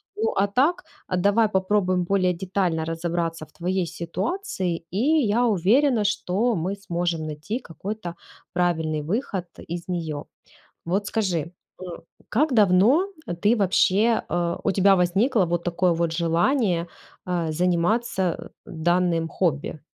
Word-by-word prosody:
Ну, 450 +2 0
а 200 - +3
так, 300 - +1 0.2
а 185 - -1
давай 205 +4 +3
попробуем 190 -2 +1
более 185 0 +2
детально 180 -3 -1
разобраться 165 -1 -2
в - - -27
твоей 180 0 -1
ситуации, 180 - -3
и 195 - -2 0.3
я 230 +4 +2
уверена, 220 - +3
что 210 +3 0
мы 180 +4 -2
сможем 175 -4 -2
найти 155 - -4
какой-то 185 0 -6 0.4
правильный 160 -3 0
выход 190 - -2 0.2
из 170 +1 -5
нее. 160 -5 -3 0.6
Вот 195 +4 0
скажи, 180 -6 -1 0.3
м, 180 -2 -7 0.3
как 285 +5 +2
давно 215 - +4 0.3
ты, 215 +3 +4
вообще, 205 +3 +3
э, 170 -1 0
у - - +2
тебя 195 0 +5
возникло 195 +4 +2
вот 170 0 -1
такое 175 0 +1
вот 170 0 0
желание, 170 - +1 0.4
э, 170 -3 -1
заниматься, 180 +6 +1 0.2
э, - - -9 0.2
данным 170 0 +1
хобби? 155 -3 -1
180 Hz, 130 wpm, -24 LUFS, 170-210 Hz, 0.6 s, тебя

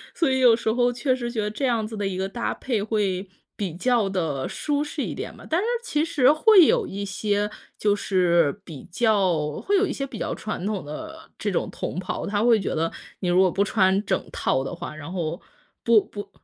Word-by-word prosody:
所 325 -6 +2
以 260 - +1
有 245 -3 +6
时 220 -1 -1
候 245 +1 +2
确 255 +2 0
实 240 -2 -4
觉 235 -2 -4
得 210 - -2
这 265 +5 -1
样 230 -3 +1
子 220 +1 -7
的 205 -2 -2
一 185 -1 -3
个 190 +1 -1
搭 235 +4 -3
配 235 -6 -2
会 200 -3 -1 0.3
比 195 -6 -3
较 235 +2 +2
地 160 -8 -2
舒 290 -1 -1
适 300 - -4
一 - - -3
点 - - -6
吧。 - - -13
但 325 - +1
是 - - -2 0.2
其 300 -10 0
实 285 -5 +4
会 365 +4 +7
有 475 +1 +3
一 200 +1 -5
些 205 +1 -1 0.3
就 205 -1 +2
是 180 -3 +2
比 155 -8 -10
较 185 -8 +1
会 405 - +1
有 400 - +3
一 - - -3
些 275 - -3
比 255 - -8
较 - - -2
传 215 - -5
统 205 -3 -2
的 320 - -8
这 205 - -2
种 180 - -1
同 - - -5
袍， 185 - -4
他 205 +1 0
会 235 -2 +5
觉 195 - -2
得， 165 +1 0 0.3
你 180 - -1
如 175 +1 +4
果 185 -1 +4
不 195 - +2
穿 195 -1 +2
整 190 - 0
套 130 0 0
的 135 - -5
话， 170 -3 -7
然 155 +2 -8
后， 170 -2 -3 0.4
不 230 -2 +5
不 205 - -7
对， - - -14
205 Hz, 250 characters per minute, -24 LUFS, 185-245 Hz, 0.4 s, 会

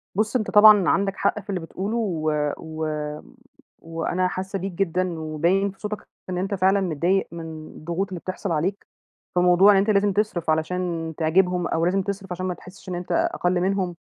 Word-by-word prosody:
بُص 215 +3 0
أنت 215 -4 0
طبعًا 210 -2 +7
عندك 195 0 +1
حق 200 +2 +1
في 200 0 -15
اللي 190 -2 -1
بتقوله، 195 +7 -4
و 165 -8 -1 0.3
و 160 0 -5 1.0
وأنا 165 +3 -1
حاسّة 190 +2 -4
بيك 195 +1 -4
جدًا، 180 -2 -1
وباين 170 +6 +1
في 195 - -23
صوتك 210 0 -5 0.2
إن 180 - -2
أنت 195 +2 -2
فعلًا 190 +1 +3
متضايق 180 +2 +1
من 160 -2 -8
الضغوط 170 +5 -4
اللي 180 -2 -5
بتحصل 185 +1 -4
عليك، 180 +6 -1 0.5
فموضوع 180 +3 +6
إن 195 - +5
أنت 200 +3 +2
لازم 200 -1 +3
تصرف، 205 -6 -1
علشان 165 0 -1
تعجبهم، 180 +2 +2
أو 165 +1 0
لازم 190 +2 +2
تصرف 195 -1 -5
عشان 185 +1 -3
ما 180 - -1
تحسّش 185 +2 -13
إن 180 - -3
أنت 175 0 -6
أقل 180 0 +1
منهم، 190 -2 0
185 Hz, 185 wpm, -24 LUFS, 170-195 Hz, 1.0 s, طبعًا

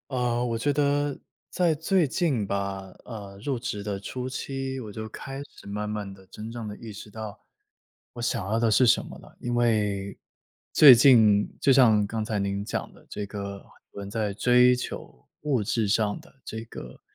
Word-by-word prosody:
呃， 120 -2 0
我 115 -2 -1
觉 145 +5 +1
得 145 0 +1 0.3
在 175 -3 +2
最 165 +3 +2
近 135 - 0
吧， 95 -1 -3
呃， 100 -4 -9
入 135 -3 0
职 115 -3 -4
的 100 -1 -3
初 125 +6 -5
期， 135 0 -4
我 110 -3 -8
就 110 +1 -6
开 135 +5 -7
始 - - -17
慢 105 +1 -4
慢 105 -2 -4
地 95 -1 -17
真 110 +4 -8
正 115 -2 -6
地 105 - -6
意 115 0 -9
识 105 +1 -10
到， 110 0 -8 0.7
我 120 - -7
想 115 -4 -1
要 110 +3 0
的 115 -1 +2
是 125 +3 +5
什 - - +4
么 - - -10
了。 - - -16
因 120 - -2
为 105 -4 0 0.5
最 140 -5 +10
近 110 -5 +6
就 135 - +4
像 110 -6 +5
刚 110 +1 -3
才 110 -1 -2
您 100 0 -2
讲 - - -4
的 - - -19
这 105 - -4
个 100 -1 -7 0.3
人 100 -1 -7
在 105 -1 -2
追 125 +4 +5
求 65 - -8
物 140 -6 +1
质 105 +1 0
上 105 -1 +1
的 170 - -20
这 110 - -5
个 65 - -10
110 Hz, 205 characters per minute, -26 LUFS, 100-125 Hz, 0.7 s, 最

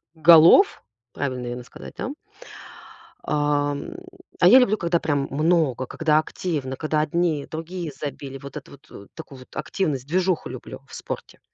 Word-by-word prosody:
голов. 165 - +6 0.3
Правильно, 130 -3 -3
наверно, 125 0 -6
сказать, 125 - -12
да. - - -3 1.1
Ам, 145 - -1 0.4
а - - +6
я 260 - +9
люблю, 215 -4 +2
когда 170 -2 0
прям 145 -4 -1
много, 150 -3 +1
когда 155 +1 +2
активно, 150 -5 -4
когда 155 -1 0
одни, 155 -1 0
другие 165 +1 -6
забили. 140 -1 -7
Вот 140 0 -11
эту - - -11
вот, 140 +2 -16
э, 100 - -12
такую 145 -5 -10
вот 130 - -16
активность, 145 -9 -2
движуху 180 +2 0
люблю - - -9
в - - -11
спорте. - - -7
150 Hz, 150 wpm, -23 LUFS, 140-170 Hz, 1.1 s, я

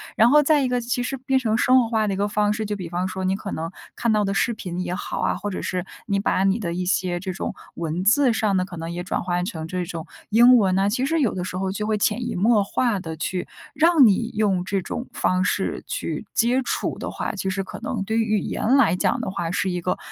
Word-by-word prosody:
然 225 +2 +5
后 300 +3 +6
再 295 0 +3
一 260 - 0
个 250 0 +1
其 245 +1 -2
实 270 +2 -3
变 265 +1 0
成 225 -4 +1
生 255 +1 +5
活 230 - -4
化 220 -2 +1
的 200 - 0
一 - - -3
个 205 +1 0
方 210 0 +1
式， 220 0 -3
就 210 0 -3
比 180 -3 -6
方 175 +2 -2
说， 190 0 -3
你 190 +1 +1
可 200 0 -6
能 165 +1 -3 0.3
看 235 -2 +1
到 210 -1 +2
的 195 -1 -1
视 235 +4 +1
频 180 -4 -6
也 180 0 -2
好 - - -4
啊， - - +1
或 205 - -4
者 190 - -4
是 180 -1 -3 0.2
你 200 -2 0
把 195 -1 +1
你 195 +2 +3
的 175 -7 -3
一 180 +1 -2
些 180 -1 0
这 185 0 -4
种 - - -4 0.2
文 170 +2 -3
字 255 +4 +5
上 215 -3 +1
的 185 - +2
可 185 -2 -8
能 165 0 -5
也 175 +1 -4
转 185 - -2
换 175 0 -1
成 160 -5 -5
这 180 +2 -2
种 165 -2 -6 0.2
英 240 +4 +7
文 195 -6 +3
呢， 195 +1 +2
其 245 +5 0
实 325 +4 +1
有 255 -8 +2
的 180 - -3
时 180 - -5
候 190 0 -1
就 210 +1 -3
会 215 0 0
潜 210 +3 +1
移 240 - -3
默 225 -3 +4
化 215 +1 0
地 160 -3 -6
去， 180 +3 -3 0.3
让 325 -3 +5
你 225 +2 +3
用 200 -4 +1
这 195 +1 0
种 240 +7 -5
方 185 0 +1
式 190 +1 -1
去 160 +4 -4
接 240 +3 +2
触 - - -2
的 - - -4
话， - - -3
其 195 -1 -3
实 195 +1 -2
可 185 - -9
能 - - -3
对 220 +3 0
于 220 -1 +1
语 - - +1
言 255 +6 +1
来 275 - +4
讲 180 - +1
的 - - -3
话， 175 -3 -3
是 190 +1 0
一 180 0 -3
个 180 - -1
200 Hz, 295 characters per minute, -23 LUFS, 185-235 Hz, 0.3 s, 英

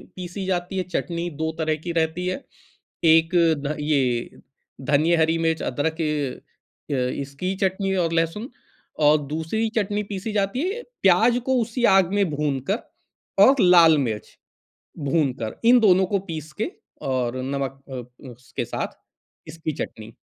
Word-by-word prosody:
PC 185 +1 -6
जाती 185 0 -2
है, 185 - 0
चटनी 175 -1 -3
2 160 0 0
तरह 155 -1 +1
की 175 - -3
रहती 160 +3 -1
है। 230 +10 -3 0.6
एक 165 +2 +5 0.3
ध 150 +2 -2
ये 135 -5 0 0.4
धनिये, 150 +5 +2
हरी 160 0 +2
मिर्च, 160 -1 0
अदरक 160 +3 -2 0.9
अ, - - 0
इसकी 140 +7 -2
चटनी 190 +1 0
और 170 -3 +1
लहसुन, 165 +8 -1 0.5
और 150 0 +5
दूसरी 160 +10 -2
चटनी 210 -1 0
पीसी 200 +2 -4
जाती 200 +4 0
है 475 +3 -6 0.2
प्याज़ 220 +6 +5
को 260 - +2
उसी 235 +2 -2
आग 190 -1 +3
में 205 -1 +3
भूनकर 150 - -1 0.7
और 270 - +7
लाल 170 -4 +7
मिर्च 110 -6 -3 0.7
भूनकर। 135 -7 -1
इन 250 0 +7
दोनों 190 -4 +5
को 200 - +3
पीस 155 -1 -5
के 320 - -1 0.4
और 130 -1 -1
नमक 135 0 -3
अ, 125 0 -9
उसके 125 +1 -6
साथ - - -4 0.5
इसकी 160 -1 -4
चटनी। 110 +1 -10
165 Hz, 145 wpm, -23 LUFS, 140-190 Hz, 0.9 s, और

